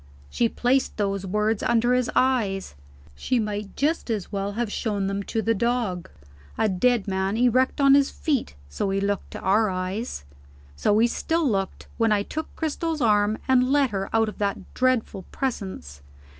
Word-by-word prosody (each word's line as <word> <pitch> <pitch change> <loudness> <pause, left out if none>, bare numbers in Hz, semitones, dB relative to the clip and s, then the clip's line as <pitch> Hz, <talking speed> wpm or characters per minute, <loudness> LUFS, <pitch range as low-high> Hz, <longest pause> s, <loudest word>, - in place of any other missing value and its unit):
She 235 - +1
placed 255 +4 0
those 200 -2 -1
words 210 +2 0
under 235 +1 +2
his 250 -1 +1
eyes 220 - +1 0.4
she 245 - -1
might 210 -2 -4
just 305 -1 0
as 210 -5 -3
well 200 0 -2
have 230 0 -2
shown 205 -3 -1
them 195 +1 -2
to 220 +2 -2
the 230 - +2
dog. 225 -5 -1 0.5
A 220 - +2
dead 215 +3 +1
man, 190 +2 -1
erect 250 +3 +2
on 275 -1 +6
his 280 0 +5
feet 275 - -2
so 70 - -2
he 195 0 0
looked 200 0 -2
to - - -7
our 210 +3 +3
eyes. 185 - -4 0.5
So 205 - +2
he 225 - +5
still 325 +6 0
looked, 195 -5 -2
when 225 -1 +3
I 205 -1 +2
took 315 +8 -5
Cristel's 320 0 -2
arm, 210 -3 +3
and 255 0 +3
led 280 -4 +3
her 195 -1 -3
out 225 0 +2
of 215 - -7
that 200 -1 -3
dreadful 255 -6 0
presence. 190 - -4
220 Hz, 175 wpm, -25 LUFS, 195-250 Hz, 0.5 s, on